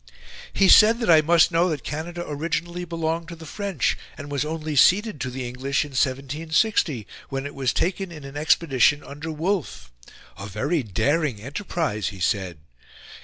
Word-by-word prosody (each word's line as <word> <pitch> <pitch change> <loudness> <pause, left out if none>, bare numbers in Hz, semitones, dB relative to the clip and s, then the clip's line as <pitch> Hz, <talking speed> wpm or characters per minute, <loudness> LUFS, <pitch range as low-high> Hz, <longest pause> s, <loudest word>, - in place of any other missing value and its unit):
"He 195 - +3
said 225 +4 +7
that 225 -7 +2
I 160 -1 +7
must 165 +1 +4
know 170 +2 +2
that 150 -6 -3
Canada 175 +3 -5
originally 170 +4 -3
belonged 165 0 -3
to 170 - -8
the 160 0 -12
French, 195 - -1 0.2
and 145 - -8
was 140 -1 0
only 155 0 -4
ceded 195 - +4
to 125 - -2
the 125 0 -5
English 135 +4 -1
in 145 - -11
1760, 140 - 0 0.2
when 135 0 -4
it 145 - -6
was 135 -3 0
taken 190 +1 -1
in 155 -3 -10
an 135 0 -10
expedition 150 -2 +2
under 145 +3 -7
Wolfe: 155 - -3 0.5
'a 100 - -6
very 145 - -1
daring 125 - 0
enterprise,' 135 - -3
he 100 - -6
said. 90 -2 -1
150 Hz, 170 wpm, -24 LUFS, 135-170 Hz, 0.5 s, said